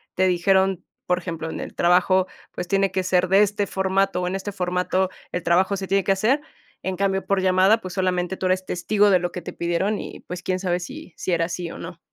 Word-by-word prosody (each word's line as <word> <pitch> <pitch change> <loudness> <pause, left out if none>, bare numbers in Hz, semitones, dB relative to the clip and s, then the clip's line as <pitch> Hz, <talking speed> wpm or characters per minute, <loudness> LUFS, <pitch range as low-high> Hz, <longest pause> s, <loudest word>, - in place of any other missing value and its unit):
te 185 0 +3
dijeron, 190 +1 +2 0.2
por 180 0 +2
ejemplo, 165 -3 -5
en - - -5
el - - -7
trabajo, 185 +2 +3 0.3
pues: 180 - -5
"Tiene 195 0 +2
que 185 - -1
ser 180 0 +2
de 195 +2 +5
este 205 0 +1
formato 190 -1 0
o 180 - -1
en 185 - -2
este 195 +1 -4
formato, 180 0 0 0.2
el 180 -1 -3
trabajo 185 +4 +3
se 190 -1 -5
tiene 195 -1 +2
que 195 - +1
hacer". 230 +9 +2 0.4
En 190 0 -2
cambio, 195 0 0
por 200 -1 +1
llamada, 190 +4 +4
pues, 185 -1 -7
solamente 185 0 -1
tú 185 - -3
eres 185 0 +1
testigo 205 +4 +2
de 185 - +5
lo 175 0 -3
que 180 - -6
te - - -7
pidieron 180 +5 -1
y, - - -8
pues, 180 0 -7
quién 185 0 -1
sabe 180 -2 0
si 275 - -9
sí 185 - -3
era 165 -1 +2
así 175 0 -4
o - - -8
no. 165 0 -8
185 Hz, 235 wpm, -23 LUFS, 180-195 Hz, 0.4 s, de